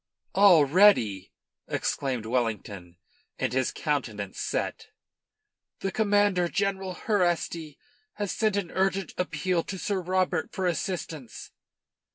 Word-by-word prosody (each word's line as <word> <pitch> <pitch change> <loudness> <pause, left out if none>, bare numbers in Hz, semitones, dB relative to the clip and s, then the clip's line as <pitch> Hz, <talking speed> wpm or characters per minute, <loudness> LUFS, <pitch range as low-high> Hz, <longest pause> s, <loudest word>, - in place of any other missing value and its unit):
"Already!" 165 - +5 0.4
exclaimed 130 -5 -2
Wellington, 105 -7 -3 0.4
and - - -1
his 130 -1 +1
countenance 110 -10 -3
set. - - -3 0.9
"The 195 - -1
commander, 205 -4 +2
General 195 -1 -1
Herrasti, 175 -7 -1 0.4
has 205 -2 -3
sent 215 -3 +1
an 180 -5 -2
urgent 190 -1 0
appeal 180 -1 0
to 190 - -5
Sir 195 0 -1
Robert 180 -2 0
for 190 - -2
assistance." 165 - -4
180 Hz, 105 wpm, -27 LUFS, 130-195 Hz, 0.9 s, Already